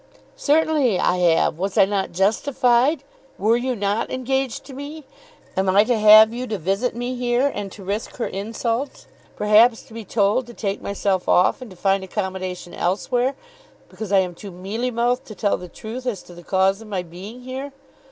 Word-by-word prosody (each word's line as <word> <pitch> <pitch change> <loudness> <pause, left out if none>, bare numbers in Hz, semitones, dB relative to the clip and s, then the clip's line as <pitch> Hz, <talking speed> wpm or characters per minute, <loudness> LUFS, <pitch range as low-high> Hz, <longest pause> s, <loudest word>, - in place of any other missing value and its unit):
"Certainly 300 - +2
I 180 - +2
have. 170 -2 +2
Was 195 +1 -2
I - - +7
not 195 -1 -2
justified? 245 - +2 0.3
Were 215 +4 +3
you 250 +1 -1
not 205 +1 -1
engaged 260 0 -2
to 270 - -11
me? 290 +3 -8 0.5
Am 190 0 +1
I 200 +2 +5
to 245 +2 +1
have 215 +1 +8
you 250 +1 -4
to 215 - -2
visit 195 +8 -1
me 245 +1 -3
here, 245 +3 +1
and 200 -1 -5
to 200 - -11
risk 200 +4 -4
her 240 - -2
insults, 230 +6 -3 0.3
perhaps 220 +3 +4
to 250 - -17
be 225 0 -7
told 210 +4 +1
to 240 - -11
take 200 -2 -3
myself 195 -2 -1
off 180 +7 +3
and 250 - -8
to 185 - -14
find 195 +1 +1
accommodation 185 -2 -4
elsewhere, 245 +8 0 0.5
because 215 -3 -7
I 200 - +5
am 180 -1 -3
too 200 +4 -10
mealy 195 +7 -4
mouthed 245 +1 0
to 215 - -10
tell 205 -1 +1
the 180 - -10
truth 240 +8 -7
as 220 -6 -3
to 175 - -14
the 175 - -12
cause 190 +3 +1
of 225 - -11
my 190 -4 -3
being 190 +8 -10
here? 260 +3 -6
215 Hz, 190 wpm, -22 LUFS, 195-250 Hz, 0.5 s, have